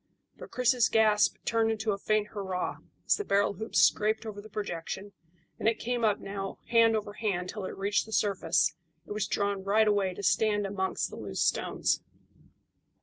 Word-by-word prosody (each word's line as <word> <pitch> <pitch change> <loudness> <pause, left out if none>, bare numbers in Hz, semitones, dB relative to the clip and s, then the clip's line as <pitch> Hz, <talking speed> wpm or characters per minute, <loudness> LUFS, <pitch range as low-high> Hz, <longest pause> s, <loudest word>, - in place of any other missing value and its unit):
But - - -11
Chris's 250 -2 +2
gasp 215 -1 +4
turned 225 -1 +2
into 220 0 -1
a 200 - -1
faint 215 0 0
hurrah 190 -3 -3 0.3
as - - +3
the 415 - -3
barrel 200 - +2
hoops 220 +4 -4
scraped 215 +1 +3
over 205 -2 -6
the 215 - -13
projection, 200 0 -5 0.5
and - - 0
it 230 - -2
came 245 0 -2
up 210 -2 +3
now 195 0 -6
hand 230 -1 +5
over 210 -1 -3
hand 190 -5 -2
till 205 -1 -5
it - - -6
reached 200 +2 0
the - - -11
surface 185 -7 +2 0.3
and - - -6
was 210 -1 -1
drawn 200 -1 -1
right 215 +3 +3
away 200 -3 +1
to 200 - -7
stand 205 +1 +2
amongst 190 -1 -2
the - - -8
loose - - -2
stones. - - 0
210 Hz, 185 wpm, -29 LUFS, 195-220 Hz, 0.5 s, hand